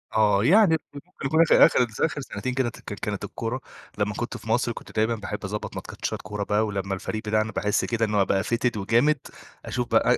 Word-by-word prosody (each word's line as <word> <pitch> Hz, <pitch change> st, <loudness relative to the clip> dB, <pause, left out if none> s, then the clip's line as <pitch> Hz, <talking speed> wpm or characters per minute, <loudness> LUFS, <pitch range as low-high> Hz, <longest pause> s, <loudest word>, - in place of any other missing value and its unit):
آه، 105 Hz, -2 st, +4 dB
يعني 185 Hz, -, +6 dB, 0.2 s
ممكن 145 Hz, +5 st, -11 dB, 0.2 s
يكون 160 Hz, +5 st, +4 dB
آخر 165 Hz, -, +7 dB
آخر -, -, +3 dB
اتذ 115 Hz, -3 st, -3 dB
آخر 145 Hz, -3 st, 0 dB
سنتين 125 Hz, 0 st, -4 dB
كده 130 Hz, -1 st, +1 dB
اتذكّر 120 Hz, -, -7 dB
كانت -, -, -4 dB
الكورة 120 Hz, +3 st, -4 dB, 0.4 s
لمّا 105 Hz, 0 st, 0 dB
كنت 120 Hz, +3 st, -4 dB
في 110 Hz, -, -11 dB
مصر 120 Hz, +1 st, +2 dB
كنت -, -, -10 dB
دايمًا 110 Hz, +2 st, +2 dB
باحب 105 Hz, -1 st, -5 dB
أضَبّط 105 Hz, +2 st, -5 dB
ماتشات -, -, -5 dB
كورة 105 Hz, -1 st, -4 dB
بقى، 105 Hz, +2 st, +1 dB
ولمّا 100 Hz, -2 st, -3 dB
الفريق 110 Hz, +3 st, -4 dB
بتاعنا 110 Hz, +1 st, +1 dB
باحس 105 Hz, 0 st, 0 dB
كده 115 Hz, -1 st, 0 dB
إن 105 Hz, -1 st, -2 dB
هو 100 Hz, -1 st, +4 dB
بقى 95 Hz, 0 st, +1 dB
fitted 120 Hz, -1 st, 0 dB
وجامد 120 Hz, +9 st, +3 dB, 0.5 s
أشوف -, -, -2 dB
بقى -, -, +3 dB
110 Hz, 210 wpm, -25 LUFS, 105-125 Hz, 0.5 s, آخر